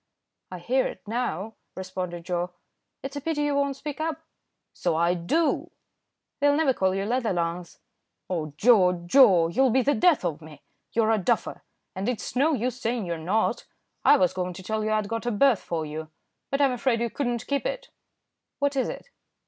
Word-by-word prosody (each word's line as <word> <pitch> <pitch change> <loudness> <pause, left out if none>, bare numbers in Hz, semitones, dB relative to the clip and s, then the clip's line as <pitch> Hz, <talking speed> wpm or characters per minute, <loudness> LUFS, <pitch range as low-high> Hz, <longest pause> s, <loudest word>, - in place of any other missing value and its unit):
"I 185 - -6
hear 250 +10 +1
it - - -10
now," 220 -3 -2 0.2
responded 185 -2 -5
Joe. 175 0 -1 0.5
"It's 270 +1 -6
a 285 - -4
pity 295 0 -1
you 290 -1 +1
won't 280 -1 0
speak 290 +2 -6
up." 320 -1 -2 0.5
"So - - -1
I 170 +2 +2
do." 240 - 0 0.7
"They'll 285 0 +4
never 295 -3 +3
call 190 -4 +1
you 195 0 -1
leather 240 +1 0
lungs." 170 0 -3 0.5
"Oh 160 -5 -3
Joe, 180 -5 +4
Joe! 180 -6 +6
you'll 265 +9 +3
be 255 +2 +3
the 285 - +3
death 295 - +3
of 165 -2 -2
me. 155 -1 -13 0.3
You're 225 -1 +2
a 220 - +2
duffer, 180 - -1 0.3
and 195 +5 -2
it 250 - -2
is - - -7
no 295 +5 +3
use 245 0 -3
saying 230 -2 -1
you're 170 -1 -2
not. 195 +7 0 0.4
I - - +7
was 185 -1 +2
going 180 -1 -3
to 185 +2 -10
tell 215 +2 -2
you 215 - -1
I'd 215 -1 +1
got 230 +2 -3
a - - +1
berth 235 0 +3
for 160 -2 -3
you, 155 +1 -6 0.4
but 275 +1 0
I'm 275 -2 +4
afraid 245 -1 0
you 235 -1 -1
could 280 - -2
not 240 -1 -2
keep 280 - -1
it." - - -5 0.7
"What 285 0 0
is 265 - 0
it?" - - -8
220 Hz, 200 wpm, -26 LUFS, 180-270 Hz, 0.7 s, I